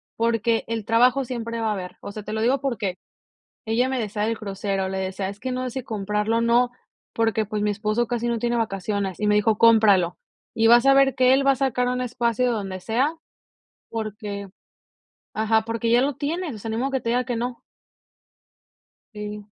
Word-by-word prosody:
porque 230 0 +1
el 225 -2 -3
trabajo 250 +4 +3
siempre 230 -2 -4
va 225 -1 0
a - - +1
haber", 185 -3 -7
o - - -7
sea, 215 - -7
te 210 - -7
lo 220 - -1
digo 255 +4 +2
porque 215 -9 -2 0.7
ella 235 +3 +2
me 265 -1 -1
decía 210 -2 -2
del 225 +1 0
crucero, 195 -2 -3
le 190 - -3
decía: 190 0 -3
"Es 200 +1 -9
que 260 - -4
no 255 0 -2
sé - - -2
si 260 +1 -5
comprarlo, 210 0 -1
o, - - +1
no, 240 +1 +3 0.4
porque, 225 -1 +1
pues, 210 0 -3
mi 210 - +1
esposo 215 +3 -1
casi 240 0 -2
no 235 -1 0
tiene 240 +1 0
vacaciones", 200 -3 -2
y 210 - 0
me 210 - +4
dijo: 210 +1 +2
"Cómpralo, 210 -7 +5 0.4
y 225 0 +3
vas 240 +2 +6
a 275 - +7
ver 270 -2 +4
que 255 0 +5
él 275 +1 +2
va - - +7
a - - +1
sacar 250 -2 0
un 250 0 -1
espacio 240 0 0
de - - +2
donde 195 -4 -4
sea, 245 - 0 0.8
porque", 210 -2 -5 0.8
ajá, 220 +1 +2
"Porque 230 0 -2
ya 240 +1 +5
lo 280 +1 0
tienes, 315 0 -3
o - - -9
sea, 225 - -6
ni 220 - -2
modo 265 +3 -1
que 265 -1 -1
te 230 - -3
diga 245 +2 +2
que 245 - -2
no". 240 +1 -4 1.5
Sí, 210 0 -6
225 Hz, 215 wpm, -24 LUFS, 210-245 Hz, 1.5 s, a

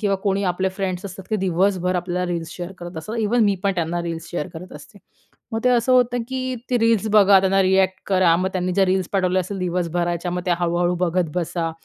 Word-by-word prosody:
किंवा 200 -3 +1
कोणी 200 0 +1
आपले 190 +1 -1
फ्रेंड्स 190 -1 -3
असतात, 190 0 -9
ते 215 - +2
दिवसभर 185 0 +1
आपल्याला 180 0 -2
रील्स 165 -1 -4
शेअर 175 +1 -6
करत 175 -1 -8
असतात, 215 +9 -6
इव्हन 225 +1 +2
मी 200 -1 +3
पण 195 - +3
त्यांना 170 0 -2
रील्स 165 -1 -5
शेअर 175 -3 -3
करत 180 +3 -9
असते. 205 - -15 0.5
मग 225 - -1
ते - - +5
असं 245 +1 +2
होतं 245 -1 +3
की 260 -1 -3 0.2
ते 245 - +2
रील्स 225 -2 +2
बघा, 200 -2 +7
त्यांना 195 0 +2
रिअ‍ॅक्ट 190 0 +2
करा, 185 -4 +3
मग 185 +2 0
त्यांनी 185 -1 -1
ज्या 195 +1 +3
रील्स 185 -1 0
पाठवल्या 185 -1 +2
असेल 195 +2 -5
दिवसभराच्या, 175 -1 -1
मग 180 0 -3
त्या 175 - +3
हळू-हळू 175 +1 +1
बघत 175 -1 0
बसा. 170 -1 -2
185 Hz, 220 wpm, -22 LUFS, 175-200 Hz, 0.5 s, बघा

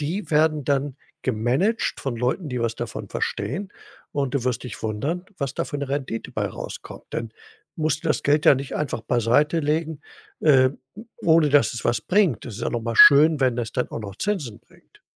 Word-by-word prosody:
die 175 +8 -3
werden 155 -1 +2
dann 140 -1 0 0.3
gemanagt 130 - 0
von 135 -4 -3
Leuten, 125 +8 -1
die 125 -2 -3
was 115 -1 -1
davon 120 -1 -6
verstehen. 185 +8 -3 0.4
Und 140 -3 -1
du 135 -4 0
wirst 125 -1 -1
dich 125 - -8
wundern, 140 - -2
was 140 -3 -2
da - - -1
für 145 - -4
'ne 140 - -3
Rendite 135 -5 -3
bei - - -1
rauskommt. - - -9
Denn, 115 -1 -4 0.4
musst 155 0 -1
das 155 - 0
Geld 145 +1 +2
ja - - +8
nicht 135 +1 -5
einfach 145 -6 -2
beiseitelegen, 150 +7 +1 0.4
äh, 130 -4 +5 0.2
hm, 220 +4 -12
ohne 160 -2 +4
dass 145 0 +4
es 120 - -6
was 120 - +1
bringt. 185 - +2
Das 120 - -7
ist - - -8
ja - - -1
noch 120 - -2
mal 115 0 -3
schön, 150 +2 +8
wenn 130 -2 +3
das 120 -2 -3
dann 125 - -1
auch - - -5
noch 100 -2 -8
Zinsen 155 - -3
bringt. - - -25
140 Hz, 200 wpm, -23 LUFS, 120-155 Hz, 0.4 s, ja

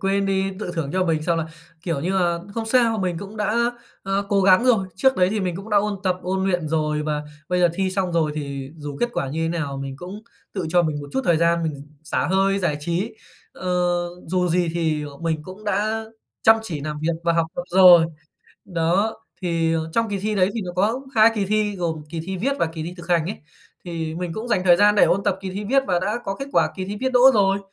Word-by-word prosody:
quên 195 +1 +1
đi 195 0 0
tự 210 - -4
thưởng 160 -5 -2
cho 185 0 +1
mình 160 -3 0
xong 165 +1 +1
là, 160 - -2 0.4
kiểu 165 -6 -2
như 175 +6 -1
là, 175 -2 +1 0.2
không 225 -1 -3
sao, 230 -1 +3
mình 180 -3 -1
cũng 200 +3 -9
đã, 215 +2 +1 0.4
a, 195 - -4 0.2
cố 200 -1 +3
gắng 190 +4 +5
rồi. 225 -7 +3
Trước 265 +6 +3
đấy 180 -1 +4
thì 215 0 -1
mình 180 -3 -2
cũng 195 +4 -9
đã 210 - +3
ôn 205 0 +1
tập, 185 -1 +2
ôn 190 +1 -1
luyện 180 -5 0
rồi 150 -1 0
và 150 -1 -2 0.3
bây 180 0 +1
giờ 175 - +5
thi 190 0 0
xong 185 -2 -1
rồi 160 -3 +1
thì 140 -2 -5
dù 145 -2 -7
kết 240 - +2
quả 135 - -2
như 160 +4 -2
thế 165 - 0
nào 160 -5 -3
mình 135 0 -5
cũng 185 +7 -9 0.3
tự 185 -5 -2
cho 175 +2 +3
mình 155 -3 -2
một 145 - -8
chút - - +1
thời 170 - +3
gian 170 +1 +2
mình 145 -3 -4 0.2
xả 155 - -1
hơi, 195 +1 +2
giải 175 -6 0
trí. 170 +8 -2 0.4
Ờ, 185 - -5 0.6
dù 180 +1 0
gì 175 0 +1
thì, 160 -3 0
ờ, 145 -1 -9
mình 160 -1 -2
cũng 190 +6 -11
đã 215 +2 0 0.4
chăm 220 0 +7
chỉ 170 -9 -5
làm 150 +1 -4
việc 165 +2 0
và 170 - +3
học 165 -1 +1
tập 175 - -2
rồi. 180 -2 +8 0.6
Đó, 180 +5 0 0.3
thì, 165 -2 +1
ờ, 160 0 -2
trong 230 +3 +1
kỳ 200 -1 -2
thi 210 +2 -2
đấy 185 -2 +3
thì 230 - -2
nó 180 - -5
có 215 +7 +1
2 220 0 +7
kỳ 205 -3 0
thi 210 0 0
gồm 165 -4 -2
kỳ 165 +1 -5
thi 190 0 -3
viết 260 +10 0
và - - +2
kỳ 160 0 -6
thi 170 +3 -6
thực 175 0 -11
hành 170 -2 +2
ấy, 200 - -4 0.5
thì 165 -3 -4
mình 175 0 -4
cũng 220 +6 -5
dành 210 -6 +1
thời 175 -2 +6
gian 205 +2 +5
để 210 - +6
ôn 195 - +2
tập 190 - +1
kỳ 190 -1 -5
thi 200 +3 -5
viết 270 +6 +3
và 180 - +2
đã 210 +5 -1
có 195 - -2
kết 275 - -4
quả 160 -2 +3
kỳ 190 - -3
thi 200 +2 -5
viết 260 0 0
đỗ 250 - +4
rồi, 195 -2 +3
180 Hz, 260 wpm, -22 LUFS, 165-200 Hz, 0.6 s, rồi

